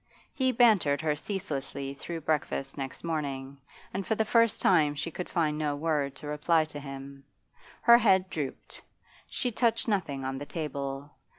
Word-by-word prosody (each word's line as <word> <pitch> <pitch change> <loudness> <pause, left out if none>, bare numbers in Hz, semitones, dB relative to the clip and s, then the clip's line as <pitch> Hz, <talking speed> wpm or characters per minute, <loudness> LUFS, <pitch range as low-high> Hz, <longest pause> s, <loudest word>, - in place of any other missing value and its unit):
He 260 -3 +2
bantered 215 - +4
her 155 -2 +1
ceaselessly 140 -6 -4
through 165 +4 -6
breakfast 145 -3 -1
next 135 -2 -6
morning, 140 -4 -3 0.3
and 195 +1 -2
for 220 +2 0
the 220 - +1
first 230 0 +3
time 155 -5 +4
she 165 +3 -3
could 180 +3 -5
find 155 -3 0
no 150 -2 0
word 145 -2 0
to - - -9
reply 155 +2 +2
to 145 - -5
him. 135 0 -9 0.6
Her 235 0 +8
head 190 -5 +4
drooped; 145 -4 -5 0.5
she 245 - -2
touched 230 0 +1
nothing 160 -11 -1
on 135 0 -3
the 145 - -5
table. 140 -3 -4
150 Hz, 165 wpm, -29 LUFS, 140-190 Hz, 0.6 s, Her